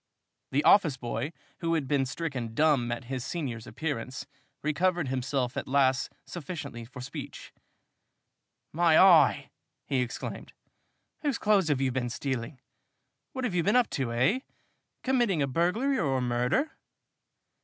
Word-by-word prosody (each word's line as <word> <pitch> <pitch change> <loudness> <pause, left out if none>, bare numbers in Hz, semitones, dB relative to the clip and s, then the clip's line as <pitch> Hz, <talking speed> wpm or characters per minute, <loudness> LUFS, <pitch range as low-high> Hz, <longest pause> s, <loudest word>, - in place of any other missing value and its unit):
The 145 +3 +2
office 165 -10 +5
boy, 125 +5 -3 0.3
who 165 -1 0
had 150 -5 -1
been 140 -2 +1
stricken 130 -6 -4
dumb 145 -5 +3
at 120 +3 -3
his 130 0 -4
senior's 135 -7 -4
appearance, 130 -5 -4 0.4
recovered 170 0 +1
himself 130 -1 -1
at - - -3
last 130 -1 +2
sufficiently 140 -8 -6
for 125 +2 -10
speech. 140 +2 -8 1.2
"My 165 0 +4
eye!" 185 -4 +6 0.3
he 135 -2 0
exclaimed. 125 -1 -5 0.7
"Whose 285 -5 -1
clothes 205 -5 +3
have 145 -3 +1
you 135 -1 +1
been 125 -1 -2
stealing? 130 +1 -4 0.7
What 260 - -4
have 240 -7 -1
you 180 - +2
been 205 +7 +2
up 250 -2 +3
to, 130 -5 -2
eh? 130 - +2 0.6
Committing 240 - +2
a - - 0
burglary 195 - +1
or 135 -4 +1
a - - -1
murder?" 125 - +1
140 Hz, 145 wpm, -28 LUFS, 130-175 Hz, 1.2 s, eye